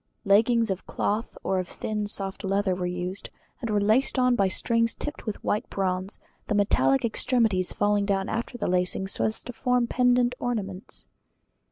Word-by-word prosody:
Leggings 225 Hz, +2 st, +4 dB
of 190 Hz, -, -5 dB
cloth 215 Hz, +3 st, -2 dB
or 190 Hz, -, 0 dB
of 180 Hz, -, -3 dB
thin 210 Hz, +2 st, -3 dB
soft 195 Hz, -1 st, 0 dB
leather 195 Hz, 0 st, +1 dB
were 180 Hz, 0 st, -2 dB
used, 180 Hz, +2 st, -4 dB, 0.3 s
and 235 Hz, -, -3 dB
were 210 Hz, -1 st, +2 dB
laced 220 Hz, +7 st, +2 dB
on 250 Hz, -1 st, +4 dB
by 195 Hz, -4 st, +3 dB
strings 230 Hz, +4 st, +2 dB
tipped 295 Hz, -5 st, -5 dB
with 215 Hz, -, -4 dB
white 210 Hz, -, -1 dB
bronze, 190 Hz, 0 st, -2 dB, 0.3 s
the 210 Hz, -, 0 dB
bright 205 Hz, 0 st, +2 dB
metallic 135 Hz, -, +3 dB
extremities 220 Hz, -5 st, +2 dB
falling 205 Hz, 0 st, +1 dB
down 195 Hz, -1 st, 0 dB
after 235 Hz, +2 st, -3 dB
lacing, 180 Hz, +1 st, 0 dB
so 195 Hz, -, -2 dB
as 220 Hz, -, -2 dB
to 245 Hz, -, -7 dB
form 250 Hz, +1 st, +1 dB
pendant 245 Hz, 0 st, +2 dB
ornaments. 200 Hz, -6 st, -3 dB
205 Hz, 175 wpm, -26 LUFS, 190-235 Hz, 0.3 s, Leggings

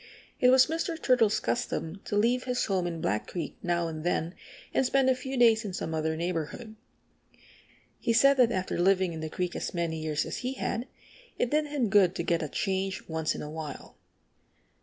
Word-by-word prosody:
It 250 Hz, -, +5 dB
was 260 Hz, 0 st, +7 dB
Mr. 330 Hz, +1 st, -3 dB
Turtle's 240 Hz, -7 st, +3 dB
custom 195 Hz, -6 st, -3 dB
to -, -, -3 dB
leave 240 Hz, +4 st, +2 dB
his 250 Hz, -1 st, 0 dB
home 185 Hz, -3 st, 0 dB
in 165 Hz, -2 st, -4 dB
Black 105 Hz, +2 st, -1 dB
Creek 170 Hz, -5 st, -5 dB
now 170 Hz, -1 st, 0 dB
and 155 Hz, -1 st, -6 dB
than 175 Hz, -1 st, -1 dB, 0.4 s
and -, -, +3 dB
spend 260 Hz, 0 st, +3 dB
a -, -, +2 dB
few 265 Hz, +1 st, -5 dB
days 230 Hz, -2 st, +5 dB
in 200 Hz, -3 st, -5 dB
some 160 Hz, -, -4 dB
other 160 Hz, 0 st, -1 dB
neighborhood. 175 Hz, +6 st, -4 dB, 1.2 s
He -, -, 0 dB
said 275 Hz, +5 st, +5 dB
that 245 Hz, -2 st, +5 dB
after 185 Hz, -4 st, -2 dB
living 185 Hz, -1 st, +3 dB
in 160 Hz, -, -6 dB
the 155 Hz, 0 st, -4 dB
creek 180 Hz, +2 st, -3 dB
as -, -, -4 dB
many 165 Hz, -2 st, -2 dB
years 155 Hz, -1 st, -1 dB
as -, -, -4 dB
he 255 Hz, +1 st, -3 dB
had 245 Hz, -1 st, -3 dB, 0.5 s
it 245 Hz, -, 0 dB
did 300 Hz, 0 st, +2 dB
him 285 Hz, -5 st, 0 dB
good 190 Hz, -4 st, +5 dB
to -, -, -2 dB
get 170 Hz, 0 st, +1 dB
a 155 Hz, -, -3 dB
change 190 Hz, +1 st, -2 dB
once 160 Hz, -1 st, -1 dB
in -, -, -5 dB
a 150 Hz, -, -6 dB
while. 155 Hz, -2 st, -7 dB
190 Hz, 200 wpm, -28 LUFS, 165-250 Hz, 1.2 s, was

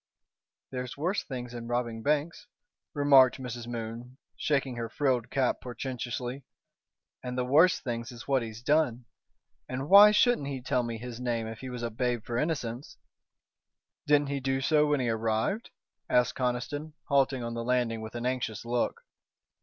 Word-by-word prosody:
"There's 125 Hz, -1 st, -5 dB
worse 180 Hz, +7 st, -1 dB
things 125 Hz, -3 st, -6 dB
than 120 Hz, -1 st, -7 dB
robbing 120 Hz, -2 st, -2 dB
banks," 150 Hz, -, -1 dB, 0.5 s
remarked 140 Hz, -3 st, +6 dB
Mrs. 120 Hz, -2 st, -6 dB
Moon, 120 Hz, +2 st, -6 dB, 0.2 s
shaking 140 Hz, -4 st, 0 dB
her 115 Hz, -1 st, -3 dB
frilled 125 Hz, -2 st, 0 dB
cap 130 Hz, -2 st, 0 dB
portentously, 125 Hz, +1 st, -5 dB, 0.8 s
"and 125 Hz, 0 st, -4 dB
the 125 Hz, -, 0 dB
worse 155 Hz, +8 st, +5 dB
things 120 Hz, -2 st, -4 dB
is 120 Hz, -1 st, -11 dB
what 135 Hz, -2 st, +2 dB
he's 115 Hz, 0 st, -7 dB
done. 130 Hz, -5 st, +2 dB, 0.6 s
And 130 Hz, +4 st, -4 dB
why 200 Hz, +2 st, +10 dB
shouldn't 210 Hz, -, +3 dB
he 135 Hz, -2 st, -3 dB
tell 125 Hz, 0 st, 0 dB
me 115 Hz, -1 st, -4 dB
his 120 Hz, 0 st, -7 dB
name 120 Hz, -2 st, -1 dB
if 110 Hz, 0 st, -7 dB
he 130 Hz, -, -7 dB
was 125 Hz, -1 st, -6 dB
a 115 Hz, -, -2 dB
babe 120 Hz, 0 st, -1 dB
for 120 Hz, 0 st, -2 dB
innocence?" 140 Hz, -4 st, -3 dB, 1.1 s
"Didn't 145 Hz, -1 st, +4 dB
he 140 Hz, 0 st, -1 dB
do 135 Hz, 0 st, 0 dB
so 150 Hz, +2 st, +3 dB
when 145 Hz, -1 st, +2 dB
he 125 Hz, -2 st, 0 dB
arrived?" 115 Hz, -, -1 dB, 0.4 s
asked 125 Hz, 0 st, +3 dB
Conniston, 130 Hz, +5 st, -2 dB
halting 135 Hz, -3 st, +2 dB
on 115 Hz, 0 st, -4 dB
the 115 Hz, 0 st, -3 dB
landing 120 Hz, -2 st, 0 dB
with 110 Hz, +1 st, -8 dB
an 120 Hz, +1 st, -4 dB
anxious 125 Hz, -4 st, -2 dB
look. 120 Hz, -, -1 dB
125 Hz, 165 wpm, -29 LUFS, 120-140 Hz, 1.1 s, why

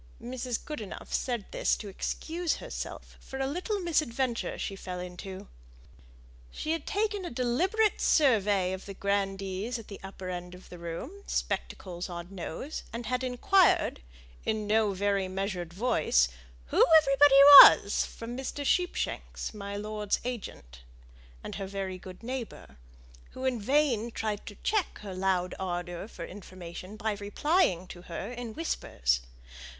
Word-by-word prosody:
Mrs. 250 Hz, -1 st, -4 dB
Goodenough 225 Hz, -11 st, -7 dB
said 240 Hz, -6 st, -1 dB
this -, -, +1 dB
to 210 Hz, -, -8 dB
excuse 330 Hz, -, -2 dB
herself -, -, -7 dB
for 265 Hz, -, -8 dB
a 270 Hz, -, 0 dB
little 365 Hz, -, -2 dB
misadventure 265 Hz, -8 st, 0 dB
she 195 Hz, -, -4 dB
fell 180 Hz, -2 st, -6 dB
into. 180 Hz, +1 st, -7 dB, 1.0 s
She 310 Hz, -, -4 dB
had 325 Hz, -2 st, -2 dB
taken 415 Hz, -1 st, 0 dB
a 350 Hz, -, -4 dB
deliberate 360 Hz, -, +1 dB
survey 205 Hz, -, +3 dB
of 190 Hz, +1 st, -7 dB
the 195 Hz, -, -7 dB
grandees 195 Hz, +3 st, -1 dB
at 225 Hz, -, -11 dB
the 200 Hz, -, -8 dB
upper 190 Hz, -1 st, -8 dB
end 180 Hz, 0 st, -6 dB
of 180 Hz, -, -15 dB
the 175 Hz, -, -10 dB
room, 170 Hz, -, -5 dB, 0.2 s
spectacles 180 Hz, -2 st, -3 dB
on 175 Hz, +2 st, -7 dB
nose, 195 Hz, -, -5 dB
and 235 Hz, +1 st, -5 dB
had 250 Hz, +3 st, -1 dB
inquired, 260 Hz, -, +3 dB, 0.4 s
in 215 Hz, -1 st, -1 dB
no 215 Hz, 0 st, +3 dB
very 200 Hz, 0 st, 0 dB
measured 185 Hz, -2 st, -3 dB
voice, 170 Hz, -, +2 dB, 0.4 s
who -, -, +4 dB
everybody 275 Hz, -2 st, +6 dB, 0.2 s
was, 200 Hz, -, +6 dB
from 230 Hz, +1 st, -7 dB
Mr. 270 Hz, +2 st, -4 dB
Sheepshanks, 355 Hz, -6 st, -1 dB
my 200 Hz, -1 st, -6 dB
lord's 210 Hz, 0 st, -2 dB
agent, 195 Hz, -, -6 dB, 0.6 s
and -, -, -6 dB
her 195 Hz, -, -3 dB
very 190 Hz, -1 st, -4 dB
good 185 Hz, +3 st, -11 dB
neighbour, 240 Hz, -, -6 dB, 0.6 s
who 260 Hz, -, -5 dB
in 250 Hz, -4 st, 0 dB
vain 255 Hz, -2 st, +2 dB
tried 215 Hz, -2 st, -4 dB
to 205 Hz, -, -7 dB
check 425 Hz, -5 st, 0 dB
her 195 Hz, -2 st, -6 dB
loud 185 Hz, -1 st, 0 dB
ardour 175 Hz, 0 st, -4 dB
for -, -, -8 dB
information 185 Hz, 0 st, -9 dB
by 220 Hz, +1 st, -1 dB
replying 205 Hz, -, +1 dB
to 175 Hz, -, -9 dB
her 180 Hz, +5 st, -6 dB
in 240 Hz, -2 st, -6 dB
whispers. 60 Hz, -, 0 dB
210 Hz, 145 wpm, -29 LUFS, 185-260 Hz, 1.0 s, everybody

